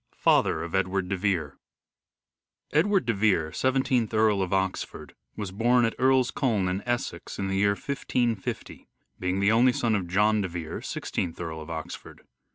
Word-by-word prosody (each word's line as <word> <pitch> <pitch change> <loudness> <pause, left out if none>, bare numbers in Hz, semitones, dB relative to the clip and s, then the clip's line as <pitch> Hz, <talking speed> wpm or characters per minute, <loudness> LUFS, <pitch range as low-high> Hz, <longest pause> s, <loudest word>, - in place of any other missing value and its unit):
IV - - -34
FATHER 80 - +3
OF 85 - -7
EDWARD 95 -1 0
DE 100 - 0
VERE 90 -7 -1 1.1
Edward 190 +2 +2
de 115 - +1
Vere, 95 -7 +2
Seventeenth 130 -2 +1
Earl 110 -2 +3
of 95 - -2
Oxford, 95 -1 -2 0.2
was 105 -3 -5
born 120 +4 +3
at 115 - 0
Earl's 130 -1 +3
Colne 110 -9 0
in 95 +2 -1
Essex, 120 -8 -3
in 95 -1 -2
the 95 - 0
year 100 +1 +3
1550, 120 -5 -3 0.3
being 90 +1 -1
the 100 +2 +3
only 120 +3 +5
son 115 -2 0
of 95 -4 -1
John 105 +4 +2
de 95 - -1
Vere, 85 -3 -6
Sixteenth 85 -2 -4
Earl 80 -2 -5
of 80 - -10
Oxford. 80 -1 -7
100 Hz, 170 wpm, -27 LUFS, 90-120 Hz, 1.1 s, only